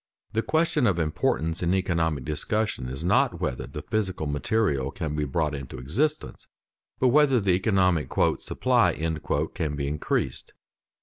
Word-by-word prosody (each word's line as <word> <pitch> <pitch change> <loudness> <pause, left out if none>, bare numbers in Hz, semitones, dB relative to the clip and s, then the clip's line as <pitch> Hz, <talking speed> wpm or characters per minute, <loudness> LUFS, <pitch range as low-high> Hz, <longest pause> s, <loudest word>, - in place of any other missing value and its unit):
The 110 - +1
question 155 -2 +1
of 95 -4 +2
importance 80 0 0
in 90 +2 +2
economic 80 -7 0
discussion 75 -2 -2
is 65 +4 -4
not 90 - +2
whether 60 - -3
the - - -7
physical 95 -7 -2
material 75 - 0
can 80 -3 -4
be 75 0 0
brought 75 +2 -1
into 70 -2 -6
existence, 135 - -2 0.5
but 130 - +3
whether 135 -1 +4
the 100 -3 +1
economic 90 -4 +2 0.3
"supply" - - +2 0.6
can 80 -5 -2
be 70 -1 -2
increased. 75 +1 -2
85 Hz, 140 wpm, -26 LUFS, 75-110 Hz, 0.6 s, whether